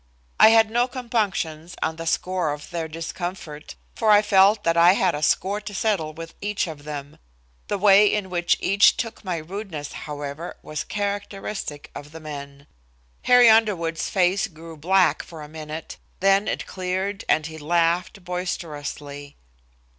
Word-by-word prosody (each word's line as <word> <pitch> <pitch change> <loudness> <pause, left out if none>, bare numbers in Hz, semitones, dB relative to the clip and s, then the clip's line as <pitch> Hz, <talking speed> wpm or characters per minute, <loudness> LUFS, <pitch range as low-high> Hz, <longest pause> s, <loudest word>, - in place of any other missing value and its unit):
I - - +9
had 225 -1 +5
no 240 +2 +2
compunctions 200 - -2
on 160 0 -2
the 165 0 -6
score 180 -2 0
of 145 0 -10
their 165 -2 -3
discomfort, 165 -1 -6 0.2
for 220 -2 0
I 210 0 +7
felt 205 +1 +4
that 165 0 +2
I 170 +2 +7
had 190 -2 +2
a 150 - -4
score 195 +6 +1
to 210 -1 -8
settle 190 -8 0
with 165 +1 -9
each 205 0 -1
of 155 -4 -9
them. 145 -2 -7 0.5
The 205 - -1
way 200 +1 +6
in 200 -3 -2
which 175 -1 +1
each 200 +1 +4
took 225 -2 -5
my 180 -4 -2
rudeness, 165 -3 -6
however, 145 +2 -6
was 155 -1 -4
characteristic 200 -6 -4
of 145 +1 -10
the 160 - -8
men. 140 -2 -9 0.6
Harry 245 -1 +7
Underwood's 205 -8 +3
face 185 +1 +2
grew 165 -2 -12
black 185 +5 +2
for 160 -3 -10
a - - -9
minute, 155 +1 -8 0.2
then 195 +2 +3
it - - -2
cleared 190 +2 -3
and 155 0 +3
he 160 0 -7
laughed 170 +4 0
boisterously. 150 -5 -5
175 Hz, 160 wpm, -23 LUFS, 155-200 Hz, 0.6 s, I